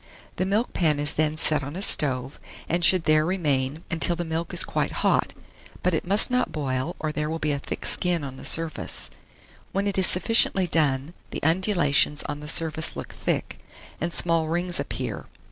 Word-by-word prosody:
The 185 - 0
milkpan 190 -7 0
is 145 0 0
then 155 0 0
set 155 -2 +3
on 140 +3 -7
a 190 - -5
stove, 130 -5 +1 0.3
and 170 +2 -1
should 180 0 +5
there 155 -1 +3
remain 155 -4 -1
until 165 +1 +3
the 175 0 -4
milk 160 +1 -4
is - - +2
quite - - -2 0.2
hot; - - +1 0.5
but 180 - +1
it 160 - -2
must 205 +6 +6
not 250 0 0
boil, 135 +1 -3
or 155 -1 -3
there 150 0 -3
will 160 - -3
be 155 -2 -1
a 140 - -2
thick - - -6
skin 175 -3 0
on 135 -1 -7
the - - -11
surface. 165 -1 -2 0.6
When 195 +1 -1
it 200 -1 +1
is 185 - +5
sufficiently 190 -1 +4
done, 150 -2 0 0.2
the - - -6
undulations 165 -4 +2
on 145 0 -5
the 150 - -9
surface 160 0 0
look - - -8
thick, - - -3 0.4
and 170 +2 -2
small 165 -2 +1
rings 175 +2 +1
appear. - - -5
160 Hz, 190 wpm, -24 LUFS, 150-175 Hz, 0.6 s, must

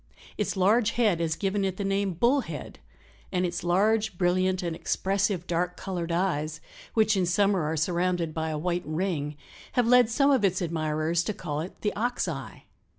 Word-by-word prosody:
Its - - -2
large 215 +4 +3
head 215 -8 +2
has 160 -1 0
given 200 0 -1
it 190 -1 -1
the 200 - -2
name 195 -1 0
Bull 240 - +3
head - - -8 0.5
and 180 -1 +1
its 175 -1 -3
large, 205 +3 +2
brilliant 185 +1 +1
and 170 -2 -2
expressive 195 0 0
dark 180 +1 -1
colored 175 -3 -4
eyes, 160 -4 -1 0.4
which 220 -1 +4
in 185 -2 +1
summer 195 +1 +2
are 160 +1 -1
surrounded 175 0 0
by 160 0 -2
a 155 - -2
white 175 +3 -1
ring, 155 -3 -2 0.4
have 245 - +3
led 245 -1 +5
some 275 +4 +3
of 265 -5 +3
its 185 -2 +2
admirers 160 -1 0
to 205 +4 -3
call 150 -4 -4
it 175 - -8
the 210 - 0
Ox 245 +4 -1
eye. - - -6
180 Hz, 185 wpm, -27 LUFS, 170-205 Hz, 0.5 s, led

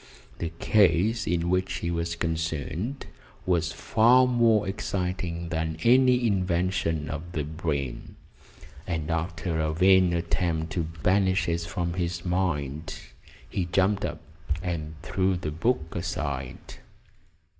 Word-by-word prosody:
The 85 - -2
case 105 +3 +3
in 85 0 0
which 95 +1 +1
he 85 - -2
was 85 0 -2
concerned 85 - -3 0.4
was 85 -2 +1
far 120 +9 +4
more 115 -5 +3
exciting 90 -3 -3
than 80 -1 -2
any 125 0 +5
invention 90 -5 0
of 80 +3 -6
the 80 -4 -1
brain, 75 -4 -4 0.7
and 80 -2 -2
after 85 0 -2
a 80 0 0
vain 95 +1 +5
attempt 85 -1 -1
to 85 -4 -1 0.2
banish 95 -1 +3
it 85 0 0
from 85 0 -3
his 85 -1 -3
mind 80 -5 -1 0.5
he 95 - -2
jumped 95 +3 +1
up 85 -2 -3 0.4
and 80 -4 -3
threw 95 -1 +1
the 75 -4 -4
book 85 +1 -1
aside. 70 -7 -4
85 Hz, 125 wpm, -27 LUFS, 80-95 Hz, 0.7 s, any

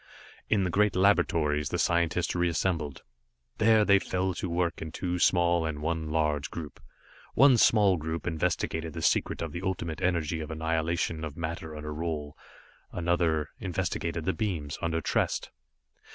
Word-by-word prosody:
In 105 -3 +3
the 90 - -1
great 105 +1 +2
Laboratories, 75 -6 +2
the - - -1
scientists 85 -1 +1
reassembled. 85 -4 -1 0.6
There, 110 -1 +5
they 100 -1 +5
fell 95 0 -1
to 90 +1 -4
work 85 0 -1
in 80 - -5
two 90 +1 -3
small, 85 -1 +3
and 80 -2 -3
one 80 0 -2
large 75 -2 0
group. 80 -3 -8 0.6
One 135 +1 +7
small 105 -5 +4
group 80 +1 -4
investigated 80 -1 -1
the 80 -2 -5
secret - - +1
of 80 - -4
the 85 - -5
Ultimate 85 -4 -3
Energy 85 -2 0
of 80 - -6
annihilation 80 0 -1
of 80 -2 -6
matter 80 -1 -5
under 75 0 -6
Roal, 75 -2 -3 0.6
another 85 -3 0
investigated 85 -2 -2
the 95 - +1
beams, 85 - -3
under 80 0 -1
Trest. - - -1
85 Hz, 150 wpm, -28 LUFS, 80-90 Hz, 0.6 s, One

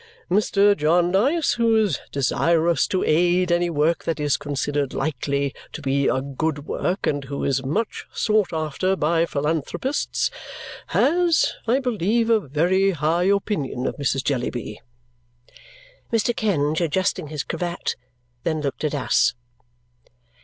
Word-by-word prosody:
Mr. 205 +1 +4
Jarndyce, 185 - +2
who 230 -1 +3
is 210 -9 +2
desirous 165 +4 +2
to 185 - 0
aid 175 +3 +2
any 175 0 +2
work 160 +1 +1
that 160 -2 -1
is 145 -1 +1
considered 145 -1 -2
likely 140 -1 -1 0.2
to - - -6
be 140 0 +1
a 130 - +1
good 145 +1 -3
work 185 +4 -2
and 145 -2 -1
who 140 +1 -5
is 135 -1 0
much 205 +12 -2
sought 215 -4 +1
after 160 +4 -1
by 165 0 +1
philanthropists, 160 - -1 0.6
has, 340 +1 +2
I 240 +3 +3
believe, 230 -2 0
a 225 - +5
very 180 +5 +1
high 160 +4 +1
opinion 190 - 0
of - - -2
Mrs. 135 -1 0
Jellyby." 120 -5 -3 1.3
Mr. 230 +1 +1
Kenge, 160 - 0
adjusting 185 +1 0
his 150 -1 -4
cravat, 175 +1 -3 0.5
then 160 -1 -1
looked 140 0 -4
at 150 -1 0
us. 130 -2 +2
165 Hz, 130 wpm, -23 LUFS, 145-200 Hz, 1.3 s, a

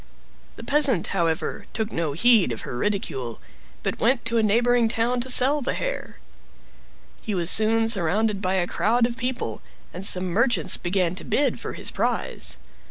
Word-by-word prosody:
The - - -11
peasant, 280 - +3
however, 165 0 -2
took 220 -1 -3
no 165 -3 -2
heed 215 - +3
of 115 - -5
her - - -7
ridicule, 130 - -3 0.4
but - - -3
went 240 +1 +1
to 230 0 0
a - - +3
neighboring 235 +2 +2
town 235 +2 -1
to 260 - -5
sell 270 +4 +4
the 260 - -2
hair. - - -5 1.0
He 215 - -4
was 175 -1 +2
soon 225 +1 +4
surrounded 205 +1 +1
by 190 -1 -1
a 180 -2 +1
crowd 230 +6 +1
of 235 0 -3
people, 250 +2 -4 0.3
and 180 - -7
some 185 -1 +3
merchants 230 +8 +1
began 180 -1 -1
to - - -6
bid 290 - 0
for - - -6
his - - -1
prize. - - -1
220 Hz, 170 wpm, -23 LUFS, 180-240 Hz, 1.0 s, sell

